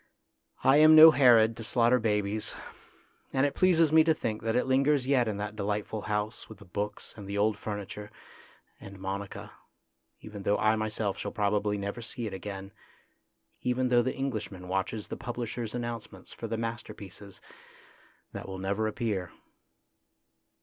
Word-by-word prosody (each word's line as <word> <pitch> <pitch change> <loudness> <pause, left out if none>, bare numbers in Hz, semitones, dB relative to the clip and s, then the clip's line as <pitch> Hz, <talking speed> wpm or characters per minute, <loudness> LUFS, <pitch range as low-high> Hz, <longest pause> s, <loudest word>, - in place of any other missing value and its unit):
I 135 +2 +6
am 155 +1 +8
no 160 +1 +11
Herod 115 -6 +5
to 115 - -6
slaughter 120 +2 +3
babies, 105 -1 -1 0.8
and 135 +1 +2
it 145 - 0
pleases 170 -4 +3
me 160 0 +7
to 160 -1 +3
think 110 -6 -3
that 115 +1 -1
it 125 - +2
lingers 135 +1 +2
yet 130 -3 +2
in 105 -2 -2
that 105 +1 -5
delightful 105 +1 -3
house 105 +2 -3
with 110 - -11
the 105 - -15
books 105 +3 -5
and 100 -2 -10
the 100 +1 -3
old 105 +1 +2
furniture 105 0 -6 0.7
and 100 0 -11
Monica, 95 +1 -6 0.7
even 105 -2 -9
though 100 +1 +1
I 110 +1 +3
myself 110 -2 -2
shall - - -4
probably 105 -1 0
never 100 +4 -4
see 115 +1 -5
it 105 - -5
again, 95 0 -7 0.9
even 125 0 0
though 120 -1 +5
the 130 +2 -2
Englishman 110 -9 -4
watches 95 +3 -2
the - - -5
publishers' 120 -1 -5
an 120 - -2
nouncements 120 -2 -7
for 115 - -6
the 115 +1 -3
masterpieces 105 -4 -7 0.9
that - - -7
will 95 0 -6
never 100 +3 -1
appear. 105 -5 -3
110 Hz, 165 wpm, -29 LUFS, 100-120 Hz, 0.9 s, no